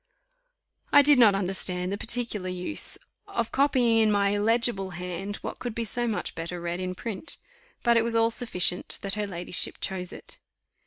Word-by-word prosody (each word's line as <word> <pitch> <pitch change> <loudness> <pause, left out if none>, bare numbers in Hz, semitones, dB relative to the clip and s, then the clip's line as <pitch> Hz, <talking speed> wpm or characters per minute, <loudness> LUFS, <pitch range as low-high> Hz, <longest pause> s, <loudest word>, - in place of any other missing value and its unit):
I 285 - +8
did 290 -2 +6
not 215 -5 +7
understand 185 -1 0
the - - 0
particular 225 -5 -2
use 180 +10 -2 0.3
of 400 - -2
copying 255 -5 +3
in 220 -1 +4
my 200 -1 +3
illegible 205 -1 +2
hand 180 +3 -4
what - - -5
could 240 -3 -4
be 235 - -1
so 240 +3 0
much 220 - -2
better 170 +2 -5
read 170 +1 -3
in 185 0 -3
print; 225 - -4 0.5
but 235 -1 +4
it 225 - +4
was 230 0 -1
all 230 0 +4
sufficient 195 -7 0
that 195 -1 -1
her 210 0 -2
ladyship 175 -2 -2
chose 185 -2 -2
it. - - -9
205 Hz, 175 wpm, -27 LUFS, 185-235 Hz, 0.5 s, I